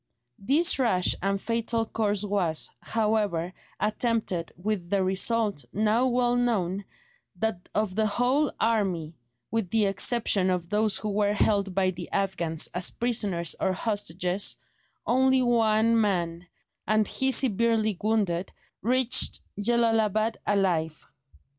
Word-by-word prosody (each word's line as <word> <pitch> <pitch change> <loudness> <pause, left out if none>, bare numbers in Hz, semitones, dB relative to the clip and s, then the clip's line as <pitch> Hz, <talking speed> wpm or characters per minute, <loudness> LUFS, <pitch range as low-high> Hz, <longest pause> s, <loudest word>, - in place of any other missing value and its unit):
This 280 - +2
rash 200 -8 +3
and 195 +1 0
fatal 230 +1 -1
course 210 -2 -1
was, 195 -6 0
however, 210 -6 -1 0.3
attempted, 210 -5 -1
with 185 -1 -3
the 195 0 +1
result, 200 -1 +1
now 220 +4 +1
well 245 -1 +1
known, 200 -6 -1 0.5
that 220 -5 -3
of 210 -2 0
the 215 +2 +1
whole 250 +7 +1
army, 190 -8 0 0.4
with 225 -5 -1
the 220 0 +2
exception 200 -1 +2
of 180 -2 -2
those 210 -1 +1
who 215 - -4
were 205 0 +1
held 200 -3 +1
by 190 -1 +2
the 175 -1 -9
Afghans 175 -5 0
as 180 +1 +2
prisoners 205 -9 0
or 190 - 0
hostages, 190 -2 0 0.5
only 260 +1 +3
one 230 -1 +3
man, 175 -4 -1 0.4
and 215 0 +2
he 265 0 +1
severely 225 -4 +2
wounded, 200 -5 0 0.3
reached 250 +3 +1 0.2
Jellalabad 225 -1 +1
alive. 170 -6 0
210 Hz, 120 wpm, -26 LUFS, 185-230 Hz, 0.5 s, rash